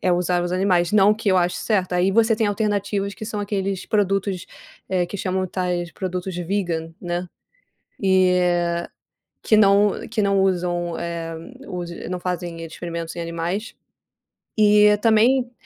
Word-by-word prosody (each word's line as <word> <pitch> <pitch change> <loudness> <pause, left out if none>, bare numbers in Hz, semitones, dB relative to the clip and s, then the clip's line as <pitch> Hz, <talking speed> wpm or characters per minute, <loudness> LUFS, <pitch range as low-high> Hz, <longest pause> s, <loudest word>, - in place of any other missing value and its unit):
é 180 - +2
usar 175 0 +1
os 175 0 -2
animais. 180 -2 +2
Não 210 0 +5
que 215 -1 -3
eu 185 - +4
ache 175 0 +1
certo. 190 -5 0
Aí, 180 +2 +2
você 225 +2 +3
tem 220 - +1
alternativas 205 -1 -1
que - - -8
são 215 -1 -4
aqueles 195 -2 -2
produtos, 195 -3 0 0.4
eh, 180 -2 +1
que 200 - -6
chamam, 185 0 -1
tais, 180 -1 -2
produtos 185 0 -4
vegan, 175 -3 -2
né. 175 0 -3 0.8
E 180 -2 +3 0.8
que 215 - +3
não 205 0 +5 0.2
que 220 0 -2
não 200 -1 +2
usam, 175 -2 0
eh, 170 -1 -4 0.3
usem 175 -2 -6
não 180 0 -3
fazem 175 -2 -4
experimentos 165 0 -6
em - - -4
animais. 170 +6 -3 0.9
E, 210 0 +6
também, 235 +4 +3
185 Hz, 150 wpm, -22 LUFS, 175-205 Hz, 0.9 s, E